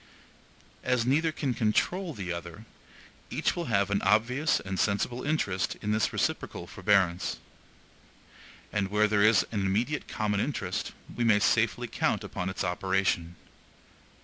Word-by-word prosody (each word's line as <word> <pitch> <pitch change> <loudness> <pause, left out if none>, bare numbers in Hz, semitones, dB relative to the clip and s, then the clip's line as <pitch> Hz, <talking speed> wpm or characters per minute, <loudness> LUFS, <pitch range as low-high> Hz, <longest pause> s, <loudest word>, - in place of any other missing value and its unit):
As 125 -2 +1
neither 155 +5 +2
can 140 -4 -2
CONTROL 160 - 0
the 90 -3 -4
other, 85 +5 -8 0.6
each - - 0
will 175 - -3
have 100 -5 +1
an 100 - +1
obvious 115 +9 +2
and 95 -1 -4
sensible 115 +4 0
interest 105 - 0
in 105 - -2
this 110 0 +1
reciprocal - - -2
forbearance. 95 -3 +1 1.4
And 105 -2 +1
where 105 +2 +3
there 105 -1 +2
is 105 0 +5
an 105 -3 -1
IMMEDIATE 110 +10 0
common 105 -2 -1
interest, 140 +6 -2 0.2
we 120 - 0
may 110 -3 +5
safely 105 - +2
count - - 0
upon 90 - -4
its 95 - -3
operation. 90 -2 0
105 Hz, 140 wpm, -28 LUFS, 95-125 Hz, 1.4 s, is